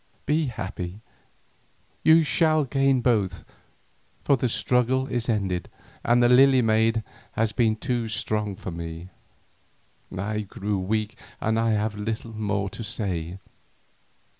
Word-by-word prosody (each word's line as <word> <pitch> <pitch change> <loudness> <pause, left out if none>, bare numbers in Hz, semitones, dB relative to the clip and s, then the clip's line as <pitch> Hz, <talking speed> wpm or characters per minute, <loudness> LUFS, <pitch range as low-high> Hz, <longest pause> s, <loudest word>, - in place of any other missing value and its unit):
Be 155 0 +1
happy, 95 -4 -5 1.0
you 160 +1 +6
shall 155 0 +2
gain 135 -1 +2
both, 105 -8 0 0.8
for 140 - +4
the 125 -1 -1
struggle 125 +3 +1
is 120 -3 -3
ended 95 -6 -1 0.3
and 120 +1 +4
the - - +6
Lily 130 +1 +6
maid 110 0 +2 0.3
has 110 -1 0
been 110 -1 +2
too 120 -1 -2
strong 105 -1 -2
for 95 - -7
me. 85 +1 -7 1.1
I 105 +3 -2
grow 100 0 -3
weak 105 +3 -2 0.2
and 110 +1 +1
I 115 -1 +2
have 105 0 -1
little 110 +2 -4
more 105 -2 -1
to 115 - -7
say. 90 -5 -3
110 Hz, 130 wpm, -25 LUFS, 100-125 Hz, 1.1 s, you